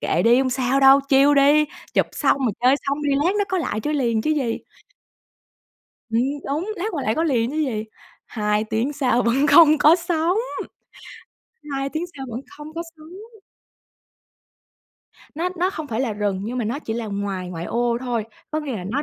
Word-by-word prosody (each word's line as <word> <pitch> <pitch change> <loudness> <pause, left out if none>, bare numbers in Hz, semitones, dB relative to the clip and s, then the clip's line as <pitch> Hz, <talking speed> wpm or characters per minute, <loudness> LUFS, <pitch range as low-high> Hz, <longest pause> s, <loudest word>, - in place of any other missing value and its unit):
"Kệ 170 - 0
đi 235 +3 +5
hông 265 -1 +1
sao 260 +1 +1
đâu, 270 +1 +7
chill 275 +1 +5
đi, 290 +2 +5 0.3
chụp - - +3
xong, 280 - +1
rồi 250 -6 0
chơi 255 +2 +5
xong 285 +2 -1
đi 290 - 0
lát 370 +4 +2
nó 410 - +2
có 380 - 0
lại 220 -10 -2
chơi 300 +6 -2
liền 235 -6 0
chứ 310 - 0
gì." 265 -7 0 1.5
Ừm, 225 +1 +2 0.3
đúng, 320 +9 -2
lát 360 - -4
quay 285 -5 -3
lại 220 - +1
có 325 - 0
liền 245 -6 +1
chứ 305 - -5
gì? 250 -9 -1 0.4
2 210 -1 -1
tiếng 225 +6 -1
sau 250 -4 +1
vẫn 255 +5 +2
không 305 +1 +7
có 310 +3 +6
sóng, 345 +1 0 1.3
2 275 0 -2
tiếng 315 +4 -3
sau 270 - -6
vẫn 230 - -5 0.2
không 300 +1 -10
có 335 - -3
sóng. 395 +8 -14 1.9
Nó 340 +4 -1
nó 360 +2 +1
không 315 -5 -6
phải 230 -3 -3
là 250 -4 -1
rừng 205 -2 -2
nhưng 245 +4 -4
mà 240 - -1
nó 235 +6 -2
chỉ 225 -7 -5
là 230 -1 -4
ngoài 200 -3 -4
ngoại 170 -1 -6
ô 235 +3 0
thôi, 240 -4 -2 0.3
có 310 - -1
nghĩa 275 -6 -4
là 180 - -7
nó 260 +9 -2
270 Hz, 200 wpm, -22 LUFS, 230-305 Hz, 1.9 s, đâu